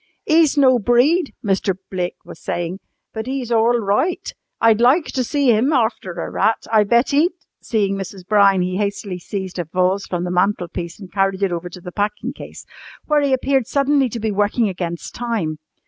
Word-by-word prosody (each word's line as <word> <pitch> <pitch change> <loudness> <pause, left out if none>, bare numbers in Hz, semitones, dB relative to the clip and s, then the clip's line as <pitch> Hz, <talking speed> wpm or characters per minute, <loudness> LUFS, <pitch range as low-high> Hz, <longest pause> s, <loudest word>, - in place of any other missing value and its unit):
"'E's 315 -2 +3
no 260 -3 +5
breed," 260 - +3
Mr. 195 -1 +1 0.2
Blake 180 -2 -2
was 170 -2 -11
saying, 175 +2 -4 0.3
"but 220 +1 -5
'e's 260 -3 -3
orl 230 +1 +3
roight. 215 - -1 0.3
I'd 225 -1 +4
loik 270 +8 +4
to 255 - 0
see 280 0 +2
'im 230 +5 +2
arfter 220 - 0
a - - -3
rat. 225 - 0
I 215 -1 +5
bet 235 +6 +2
'e'd 315 +6 +3 0.2
" - - -59
Seeing 205 -4 0
Mrs. 195 -1 -7
Brown, 200 -3 +4
he 180 +1 -2
hastily 200 -2 -3
seized 190 0 -5
a - - 0
vase 185 +4 0
from 175 -1 -2
the 180 - -3
mantel 180 -1 +1
piece 170 +3 -6
and 185 -4 -12
carried 195 0 0
it 195 - +1
over 175 +1 -4
to 180 +1 -11
the 180 - -8
packing 210 +6 -2
case, - - -11 0.4
where 300 -1 +2
he 280 -1 +1
appeared 265 -1 +1
suddenly 280 -1 +2
to 235 - -5
be 220 0 -1
working 205 +3 +1
against 175 -2 -5
time. 215 -11 -3
210 Hz, 195 wpm, -20 LUFS, 185-250 Hz, 0.4 s, no